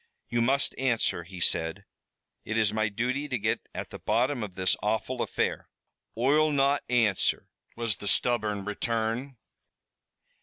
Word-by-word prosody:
"You 120 0 +1
must 135 +4 +2
answer," 120 -9 +1
he 90 +1 -9
said. 85 +3 +1 0.6
"It 110 - -2
is 105 -2 +2
my 110 -1 +1
duty 125 +7 -1
to 130 -3 -1
get 110 0 -2
at - - -5
the - - -8
bottom 125 +2 +1
of 100 -4 -5
this 95 -1 +2
awful 110 +4 -1
affair." - - -1 0.5
"Oi'll 150 +6 +3
not 140 0 +3
answer," 115 -6 +2 0.3
was 115 -3 -1
the 100 - -7
stubborn 105 -3 +1
return. 115 +5 -1
115 Hz, 145 wpm, -28 LUFS, 105-130 Hz, 0.6 s, Oi'll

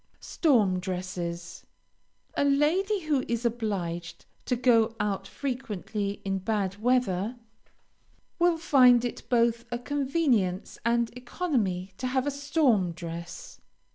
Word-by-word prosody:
STORM 215 - +2
DRESSES 180 -2 -5 0.7
A - - +1
lady 330 +9 +2
who 295 -5 0
is 235 +1 -2
obliged 195 -8 -3 0.2
to 250 - +1
go 230 -2 +3
out 205 -2 -1
frequently 210 -6 -4
in 195 0 -1
bad 200 0 -2
weather, 235 -3 +1 1.0
will 345 -1 +4
find 250 -6 +5
it 240 - -4
both 235 -1 +2
a 240 - -1
convenience 260 - 0
and 235 0 +1
economy 240 - -2
to 255 - -2
have 260 +1 0
a 290 - 0
storm 275 - +1
dress. 170 0 -8
235 Hz, 115 wpm, -28 LUFS, 190-265 Hz, 1.0 s, find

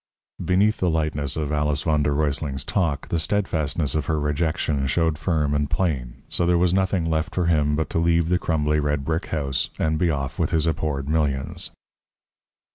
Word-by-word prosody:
Beneath 100 +4 +3
the 90 - +2
lightness 75 -3 -1
of 75 -2 -2
Alice 75 +1 0
v. 80 -3 +2
d. 75 - +1
R.'s 70 -1 -1
talk 75 -5 -1
the 85 - 0
steadfastness 80 -5 0
of 75 -3 -1
her 80 -2 +1
rejection 75 -1 0
showed 80 +1 +1
firm 75 -3 0
and 75 0 0
plain. 65 -10 -2
So 85 - 0
there 90 0 +4
was 90 0 +2
nothing 95 -2 +1
left 80 0 -1
for 90 - +1
him 75 -3 +2
but 80 +1 -1
to - - +1
leave 85 0 +2
the 90 0 +2
crumbly 75 -2 +1
red 75 -1 -1
brick 80 +3 -1
house, 70 -4 -1
and 80 0 0
be 85 - +2
off 70 -4 -3
with - - +1
his 80 -1 +1
abhorred 75 -4 -1
millions. 70 -4 -1
80 Hz, 190 wpm, -23 LUFS, 75-85 Hz, -, there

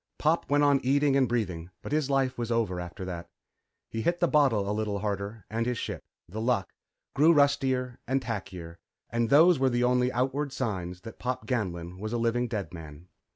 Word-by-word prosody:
Pop 160 +3 +1
went 145 +1 +3
on 140 -1 +5
eating 140 +2 +3
and 135 -3 +3
breathing, 90 -8 -2
but - - -6
his 150 -2 +1
life 135 -2 +1
was 120 -1 -3
over 110 -6 0
after 90 +1 -6
that. 85 -2 -6 0.6
He 115 - -4
hit 170 +7 0
the 175 - +3
bottle 130 -11 +3
a 105 - 0
little 105 -1 -1
harder 100 +1 -4
and 115 +2 -2
his 125 -1 -1
ship, - - -4 0.3
The 105 +6 -5
Luck, 115 -5 0 0.4
grew 150 +4 +5
rustier 135 -4 +2
and 135 +2 +2
tackier, 95 -8 -6 0.3
and 115 0 0
those 160 +3 +6
were 135 0 +3
the 120 0 +1
only 125 0 +3
outward 135 +3 -1
signs 90 -8 -3
that 115 - -10
Pop 125 0 -3
Ganlon 90 -7 -3
was 110 +3 -4
a - - +1
living 120 +1 +1
dead 105 -6 -4
man. 80 +1 -10
120 Hz, 200 wpm, -28 LUFS, 100-135 Hz, 0.6 s, those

